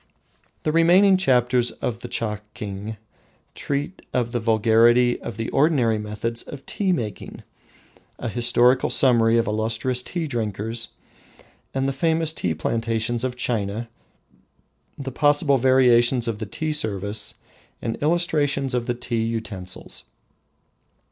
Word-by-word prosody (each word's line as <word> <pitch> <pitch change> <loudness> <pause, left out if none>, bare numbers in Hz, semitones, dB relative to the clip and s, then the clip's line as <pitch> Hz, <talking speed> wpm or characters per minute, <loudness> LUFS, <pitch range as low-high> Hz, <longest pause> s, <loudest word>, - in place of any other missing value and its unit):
The 155 - +1
remaining 180 +5 +5
chapters 125 -7 +2
of 115 -2 -4
the 120 - -7
"Chaking" 105 -2 -5 0.6
treat 145 +6 -4
of 120 -2 0
the 120 - -1
vulgarity 115 +2 +3
of 115 - -7
the 115 0 -3
ordinary 135 -7 +2
methods 105 +2 -3
of 140 -2 -10
tea 195 -3 -1
drinking, 110 - -4 0.7
a 120 - -5
historical 120 +2 +3
summary 115 -3 +4
of 115 - +2
illustrious 115 +4 -1
tea 170 +5 -4
drinkers, 115 -3 -3 0.9
the 135 +1 0
famous 160 +2 +1
tea 85 - -2
plantations 115 +5 -1
of 130 -1 -2
China, 115 -2 -2 1.1
the 135 -1 -5
possible 145 +1 +3
variations 125 -1 +4
of 110 -2 -3
the 110 - -5
tea 155 +9 -2
service 105 -5 -1 0.4
and 115 - -3
illustrations 145 -4 +1
of 120 -1 -1
the 120 - 0
tea 120 -2 -2
utensils. 110 -5 -5
120 Hz, 120 wpm, -23 LUFS, 110-135 Hz, 1.1 s, remaining